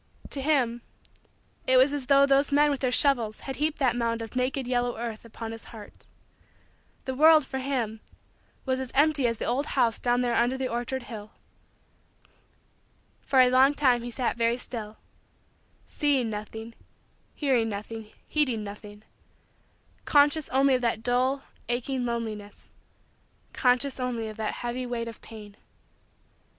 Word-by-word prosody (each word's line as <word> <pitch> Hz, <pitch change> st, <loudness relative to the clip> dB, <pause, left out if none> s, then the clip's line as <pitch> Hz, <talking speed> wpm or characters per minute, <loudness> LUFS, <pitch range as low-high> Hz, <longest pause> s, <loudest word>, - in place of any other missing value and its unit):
To 275 Hz, -, -1 dB
him, 260 Hz, -5 st, +1 dB, 0.9 s
it 260 Hz, -, +5 dB
was 265 Hz, +3 st, +5 dB
as 280 Hz, -3 st, -4 dB
though 275 Hz, +1 st, +6 dB
those 275 Hz, +1 st, +2 dB
men 295 Hz, +1 st, +4 dB
with 280 Hz, -, -2 dB
their 255 Hz, -1 st, 0 dB
shovels 240 Hz, -6 st, +2 dB
had 270 Hz, -, -6 dB
heaped 305 Hz, +1 st, 0 dB
that 255 Hz, -4 st, +1 dB
mound 230 Hz, -1 st, -1 dB
of 225 Hz, +2 st, -10 dB
naked, 255 Hz, +1 st, -1 dB
yellow, 245 Hz, -1 st, 0 dB
earth 230 Hz, -2 st, -5 dB
upon 225 Hz, 0 st, -7 dB
his 225 Hz, 0 st, -8 dB
heart. 215 Hz, -3 st, -13 dB, 1.0 s
The 260 Hz, -, -2 dB
world, 310 Hz, +2 st, +6 dB
for 265 Hz, 0 st, -4 dB
him, 250 Hz, -5 st, -2 dB, 0.7 s
was 260 Hz, -1 st, 0 dB
as 260 Hz, -2 st, -5 dB
empty 285 Hz, -2 st, +3 dB
as 230 Hz, -1 st, -1 dB
the -, -, -4 dB
old 265 Hz, +5 st, 0 dB
house 235 Hz, -3 st, +3 dB
down 245 Hz, 0 st, +1 dB
there 245 Hz, -1 st, 0 dB
under 240 Hz, +3 st, +2 dB
the 265 Hz, -1 st, -2 dB
orchard 245 Hz, +2 st, -3 dB
hill. 215 Hz, -3 st, -9 dB, 1.9 s
For 265 Hz, -2 st, +4 dB
a 250 Hz, 0 st, +5 dB
long 265 Hz, +3 st, +5 dB
time 255 Hz, -5 st, +3 dB
he 240 Hz, -, -6 dB
sat 240 Hz, 0 st, -2 dB
very 230 Hz, +1 st, +1 dB
still 220 Hz, -4 st, -6 dB, 0.9 s
seeing 275 Hz, -6 st, 0 dB
nothing, 220 Hz, +2 st, -7 dB, 0.6 s
hearing 255 Hz, -6 st, +1 dB
nothing, 215 Hz, +1 st, -6 dB, 0.2 s
heeding 255 Hz, -8 st, 0 dB
nothing 205 Hz, +1 st, -10 dB, 1.0 s
conscious 290 Hz, +1 st, +4 dB
only 270 Hz, +1 st, +3 dB
of 255 Hz, -, +1 dB
that 225 Hz, -2 st, -1 dB
dull, 255 Hz, +3 st, +1 dB, 0.3 s
aching, 245 Hz, +1 st, -1 dB
loneliness 215 Hz, -3 st, -5 dB, 0.8 s
conscious 255 Hz, +2 st, +2 dB
only 240 Hz, -3 st, -2 dB
of 215 Hz, -, -10 dB
that 220 Hz, -1 st, -2 dB
heavy 250 Hz, +1 st, -3 dB
weight 235 Hz, -1 st, -3 dB
of 230 Hz, -, -9 dB
pain. 210 Hz, -2 st, -12 dB
245 Hz, 155 wpm, -27 LUFS, 230-270 Hz, 1.9 s, though